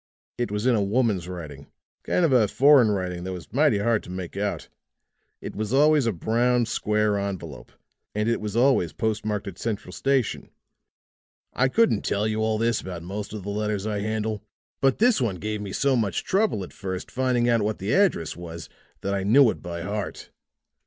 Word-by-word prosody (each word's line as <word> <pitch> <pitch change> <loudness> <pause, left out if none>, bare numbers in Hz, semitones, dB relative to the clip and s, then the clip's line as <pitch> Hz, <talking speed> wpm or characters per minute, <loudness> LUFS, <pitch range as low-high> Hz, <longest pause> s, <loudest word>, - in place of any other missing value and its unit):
It 120 - 0
was 105 +2 -2
in 130 - +4
a 110 - +2
woman's 100 -4 +1
writing 75 -6 -8 0.4
kind 180 - +2
of 160 - +2
a 115 -4 +5
foreign 135 0 +5
writing 90 -3 -2
that 95 0 -4
was 85 -5 -10
mighty - - +3
hard 110 +2 +1
to - - -13
make 90 -1 -6
out. 100 0 -2 0.7
It - - -7
was 110 +2 -3
always 150 -2 +4
a - - +2
brown, 120 +6 +1
square 105 -2 0
envelope, 95 -7 -6 0.4
and 105 +1 0
it 115 -1 0
was 105 0 -4
always 120 - +3
post 110 -1 -1
marked 105 -1 -2
at 100 - -8
Central 105 -5 -4
Station. 135 +3 -1 1.0
I 130 - +2
couldn't 225 - +2
tell 105 +2 0
you 110 0 -1
all 110 0 +1
this 115 0 +1
about 90 -3 -7
most 100 +3 -5
of 105 -2 -6
the 100 - -5
letters 105 -1 -2
I 105 -1 -2
handle, 110 0 -2 0.4
but 135 -1 +3
this 235 - +3
one 110 -6 0
gave 105 +3 -4
me 100 -2 -6
so 135 +6 +1
much 105 -6 0
trouble 195 - +1
at 90 - -10
first 95 -2 -5
finding 125 -2 +1
out 115 -2 +3
what 105 +1 -1
the 100 +4 -2
address 190 - +2
was 85 -1 -8 0.3
that 100 - -2
I 100 - 0
knew 115 +4 +6
it - - -9
by 85 -2 -6
heart. 100 +2 -5
105 Hz, 200 wpm, -25 LUFS, 95-120 Hz, 1.0 s, knew